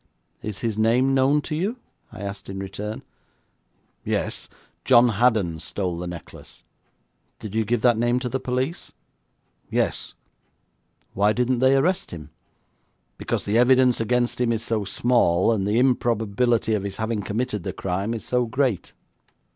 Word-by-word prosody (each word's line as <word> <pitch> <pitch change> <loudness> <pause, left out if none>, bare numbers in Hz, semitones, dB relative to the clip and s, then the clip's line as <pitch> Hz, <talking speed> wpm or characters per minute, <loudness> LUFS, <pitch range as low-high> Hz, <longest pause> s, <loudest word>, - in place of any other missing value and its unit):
'Is 105 -2 -5
his 110 -2 -2
name 125 +5 +3
known 135 +3 +3
to 155 - -5
you?' 200 +10 -2 0.3
I - - -10
asked 100 -1 -6
in 95 - -5
return. 100 +3 -6 1.0
'Yes. - - -2 0.3
John 120 -1 +6
Haddon 105 -7 +1
stole 90 +1 -3
the 90 - -4
necklace.' 85 -2 -10 0.7
'Did 105 -2 -8
you 110 0 +1
give 110 +1 -1
that 120 -3 +4
name 120 +1 +2
to 130 - -2
the 130 +2 -2
police?' 130 +6 -3 0.8
'Yes.' - - -1 1.0
'Why 105 +2 +3
didn't 125 +1 +1
they 130 +2 +4
arrest 175 +7 +1
him?' 80 -3 -9 0.9
'Because - - -2
the 110 +3 +2
evidence 125 -1 +4
against 120 +2 0
him 120 -1 +2
is 115 -1 -1
so 110 -2 -1
small, 100 -4 +2
and 100 -3 0
the 105 +2 +1
improbability 120 -2 +1
of 105 - 0
his 100 0 -5
having 110 -1 -2
committed 105 +1 -2
the - - -4
crime 95 +5 -2
is 110 - -6
so 125 -1 0
great.' 125 -6 -1
115 Hz, 155 wpm, -24 LUFS, 100-125 Hz, 1.0 s, John